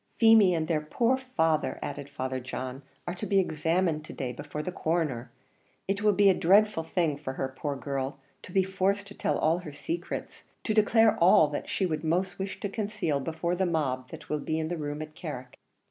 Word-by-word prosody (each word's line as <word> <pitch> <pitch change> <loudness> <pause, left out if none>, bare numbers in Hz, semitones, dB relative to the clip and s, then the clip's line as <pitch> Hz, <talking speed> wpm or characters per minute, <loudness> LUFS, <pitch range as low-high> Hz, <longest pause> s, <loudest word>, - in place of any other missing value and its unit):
"Feemy 220 -5 +6
and 160 -1 -1
their 155 -2 +1
poor 230 +11 +1
father," 165 -13 0
added 145 -1 -5
Father 130 -2 -3
John, 130 +1 -5 0.2
"are 175 - -3
to 180 - -5
be 200 - +2
examined 165 -2 +1
to - - -9
day 130 -3 -3
before 145 +4 -6
the 180 - -3
Coroner; 155 -9 -1 0.6
it 195 +1 -1
will 210 0 +4
be 200 +1 +5
a 195 - +7
dreadful 200 +1 +4
thing 160 -3 0
for 130 -3 -5
her, 130 0 -3
poor 145 0 -3
girl! 135 0 -3 0.2
to - - -11
be 190 +1 +3
forced 195 +1 0
to - - -10
tell - - 0
all 160 +3 +2
her 160 -4 -8
secrets, 330 - -5 0.2
to 215 - 0
declare 220 +1 +5
all 165 -3 +6
that 145 - -4
she 190 - 0
would 155 -3 -2
most 180 +5 0
wish 195 0 -4
to - - -1
conceal 200 -7 -1
before 160 +4 -2
the 185 +1 +1
mob 130 -6 -1
that - - -10
will 150 - -1
be 155 +2 -2
in 160 0 -2
the 175 - -1
room 150 0 -4
at 155 0 -11
Carrick." 145 -7 -7
160 Hz, 210 wpm, -28 LUFS, 145-195 Hz, 0.6 s, a